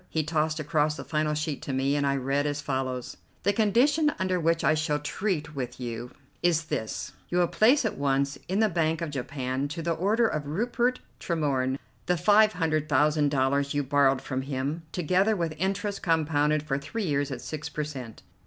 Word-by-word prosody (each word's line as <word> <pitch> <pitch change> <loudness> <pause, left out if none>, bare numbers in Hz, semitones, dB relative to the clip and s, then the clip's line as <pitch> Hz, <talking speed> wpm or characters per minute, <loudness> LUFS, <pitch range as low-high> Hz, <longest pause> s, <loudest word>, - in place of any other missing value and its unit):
He 160 - 0
tossed 155 0 0
across 150 0 +1
the - - -6
final 150 -1 0
sheet 150 -1 -2
to 140 - -4
me, 135 +2 +1
and 145 -1 +1
I 140 - +2
read 140 +2 0
as 145 0 -2
follows: 130 -3 -3 0.3
"The 200 - +3
condition 265 +9 +3
under 185 -1 0
which 165 0 +1
I - - +4
shall 155 -1 0
treat 150 +1 -2
with 125 -2 -5
you 120 -1 -5 0.3
is 170 -2 +2
this: 145 -8 -4 0.2
You 175 - 0
will 175 -1 +4
place 245 - +4
at 220 - -2
once 140 0 +1
in 195 +4 +1
the 220 - +5
Bank 165 -3 0
of 165 -3 -3
Japan, 130 0 -3
to 165 +3 -5
the 170 0 +1
order 210 +8 +2
of 150 -7 -3
Rupert 240 - 0 0.2
Tremorne, 135 -6 0 0.3
the 180 0 +2
five 215 +4 +5
hundred 155 -2 0
thousand 150 +1 +3
dollars 140 +1 +1
you 145 - +1
borrowed 135 -1 +3
from 130 -1 -2
him, 140 +4 -3
together 185 +5 +2
with 170 -4 -1
interest 195 +2 -1
compounded 155 -2 +2
for 140 -2 -1
three 225 +10 -4
years 145 -3 0
at 130 -3 -4
six 155 -1 -5
per 150 - -3
cent. 130 -7 -8
150 Hz, 195 wpm, -27 LUFS, 140-175 Hz, 0.3 s, the